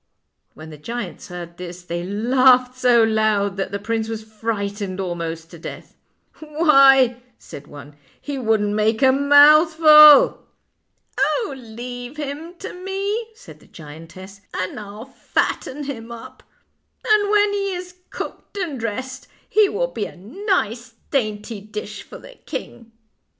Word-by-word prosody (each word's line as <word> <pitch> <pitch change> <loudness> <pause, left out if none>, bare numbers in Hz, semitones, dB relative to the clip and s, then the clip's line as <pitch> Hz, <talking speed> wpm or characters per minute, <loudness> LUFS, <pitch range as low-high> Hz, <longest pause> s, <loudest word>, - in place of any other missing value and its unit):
When 155 +1 -11
the 150 - -12
giants 235 +8 -7
heard 175 -2 -9
this 180 0 -9
they 170 0 -5
laughed 250 +5 +3
so 245 -2 +4
loud 215 -3 +1
that 195 - -2
the 200 - -2
prince 225 +2 -3
was 220 -1 -5
frightened 205 -3 -4
almost 165 -3 -5
to 170 - -12
death. - - -10 0.3
" - - -32
Why," 275 -5 +4 0.2
said 145 +1 -12
one, 145 0 -12
" - - -33
he 280 -2 -3
wouldn't 215 -3 0
make 220 +3 +1
a 260 - +6
mouth 290 +4 +6
ful." 305 -2 +8 0.4
" - - -16
Oh, 445 - 0
leave 245 +2 -9
him 300 +4 -6
to - - -8
me," 395 +5 -4
said - - -15
the - - -21
giantess, 165 +5 -12
" - - -40
and 185 +3 -4
I'll 210 +2 -9
fatten 275 +1 -3
him 235 -5 -7
up; 235 -1 -11 0.6
and 425 -2 +3
when 415 -1 +3
he 395 -2 -2
is 360 0 -8 0.2
cooked - - -8
and 330 -9 -4
dressed 255 +4 -5 0.2
he 425 -2 +3
will - - -2
be 210 - -3
a - - -10
nice 245 - -3 0.2
dainty 215 -4 -2
dish 210 0 -8
for - - -12
the - - -15
king." 230 -1 -7
235 Hz, 155 wpm, -21 LUFS, 200-295 Hz, 0.6 s, ful